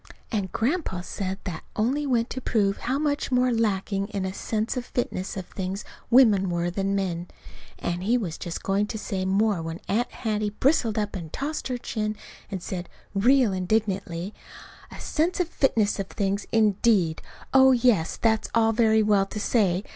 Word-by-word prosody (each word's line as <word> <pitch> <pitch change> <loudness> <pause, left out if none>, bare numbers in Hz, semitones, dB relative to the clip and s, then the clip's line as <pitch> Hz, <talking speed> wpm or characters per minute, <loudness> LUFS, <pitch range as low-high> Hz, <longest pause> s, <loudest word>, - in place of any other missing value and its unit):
And 200 -5 -1
Grandpa 240 - -1
said 190 +1 -4
that 180 -5 -5
only 270 +7 0
went 240 -2 +1
to 260 - -4
prove 200 -5 +1
how 255 +3 -1
much 290 -1 -1
more 250 0 +3
lacking 200 -3 0
in 200 -3 -3
a 190 - -3
sense 220 +4 -2
of 250 - -2
fitness 200 -6 -3
of 190 - -4
things 190 +2 -5 0.2
women 220 -7 +5
were 175 0 -1
than 195 +2 -1
men. 180 -3 -2 0.5
And 175 +1 -3
he 225 +6 +2
was 180 -9 -4
just 170 - -5
going 200 +2 +1
to 220 - -4
say 195 -3 -3
more 200 -1 +2
when 165 +1 -5
Aunt 230 +5 0
Hattie 215 -2 -1
bristled 250 -6 +2
up 210 -1 -1
and 165 -4 -6
tossed 300 +3 -3
her 250 -1 -2
chin, 215 -3 -3 0.3
and 190 -3 -5
said, 180 -2 -5 0.2
real 240 +2 +4
indignantly: 190 -1 -1 0.6
"A - - -10
sense 335 +5 0
of 360 - +1
fitness 225 -10 +1
of 195 - -2
things, 200 -1 -2
indeed! 210 -6 +3 0.3
Oh, 265 0 +7
yes, 235 -9 +3
that's 220 -1 +1
all 225 -1 +4
very 220 -1 +4
well 205 -2 +3
to 210 - -5
say. 200 -4 +2
210 Hz, 175 wpm, -26 LUFS, 190-235 Hz, 0.6 s, Oh